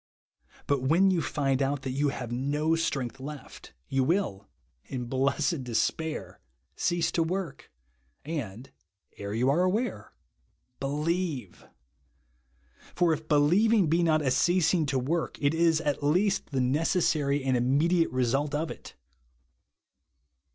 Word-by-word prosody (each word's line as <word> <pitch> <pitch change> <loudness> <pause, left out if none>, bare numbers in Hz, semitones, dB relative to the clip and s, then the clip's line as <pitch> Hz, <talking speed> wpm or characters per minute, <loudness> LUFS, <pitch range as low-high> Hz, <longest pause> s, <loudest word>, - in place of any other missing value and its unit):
But 140 -2 +1
when 170 +9 +4
you 175 -3 +1
find 135 -3 0
out 135 0 -1
that 130 - -3
you 140 +2 +1
have 125 -3 -5
no 145 +6 0
strength 135 -7 -2
left, 140 - -10
you 135 -1 +1
will, 130 - -1 0.4
in 125 -2 -5
blessed 135 +4 0
despair, 155 +6 -2 0.4
cease 175 -2 0
to 170 - 0
work, 170 -3 -3 0.3
— 65 - -43 0.2
and 110 +3 -10 0.5
(ere 100 +1 -5
you 125 +3 +1
are 165 +5 +2
aware) 185 - -1 0.3
— 125 - -46
believe! 150 - -3 1.3
For, 175 -2 +3
if 155 0 -6
believing 180 +6 +4
be 165 +2 +2
not 155 -2 +2
a 130 - +1
ceasing 175 +1 +2
to 135 -1 0
work, 155 +6 -2
it 140 +1 +2
is 165 -1 +3
at 150 -2 -1
least 180 +8 +1
the 135 -2 -1
necessary 145 0 +1
and 130 -1 +1
immediate 150 +8 +2
result 135 +4 0
of 160 +2 -2
it. - - -11
145 Hz, 135 wpm, -28 LUFS, 130-165 Hz, 1.3 s, when